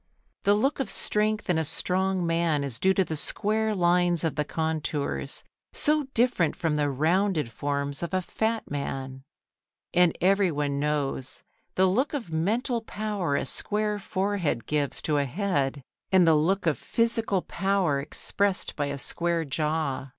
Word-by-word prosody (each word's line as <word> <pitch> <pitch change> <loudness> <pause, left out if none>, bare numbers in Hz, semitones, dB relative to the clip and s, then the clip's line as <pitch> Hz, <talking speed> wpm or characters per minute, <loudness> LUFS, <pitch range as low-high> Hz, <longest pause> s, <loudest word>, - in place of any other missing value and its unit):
The 205 +1 +5
look 270 +8 +1
of 270 - -1
strength 215 0 0
in 175 -3 +2
a - - +1
strong 185 +4 0
man 165 -3 +1
is 130 -5 -3
due 190 0 +3
to 190 - +3
the 160 - -3
square 215 +7 0
lines 175 -2 +3
of 160 - 0
the 150 - 0
contours, 155 -3 -2 0.3
so 300 -2 +1
different 230 -9 +2
from 165 -5 0
the 145 -1 +1
rounded 160 - +1
forms 140 +3 -2
of 170 - -3
a 185 - +1
fat 220 +1 -2
man. 135 -2 -4 0.7
And 180 -2 +4
everyone 165 -7 +2
knows 140 -3 -2 0.3
the 190 - +4
look 250 +11 +1
of 230 - -5
mental 225 +9 0
power 210 -8 -2
a 140 - 0
square 210 +7 -1
forehead 190 - -1
gives 145 -2 -1
to 150 -2 +1
a 140 - +1
head 140 -4 -1 0.3
and 185 -2 +6
the 165 - +6
look 175 +6 +2
of 160 -3 +1
physical 225 -5 +1
power 190 -7 0
expressed 190 +7 -1
by 145 -1 -1
a 140 0 -3
square 170 +3 -1
jaw. 150 -2 -1
170 Hz, 160 wpm, -27 LUFS, 145-200 Hz, 0.7 s, and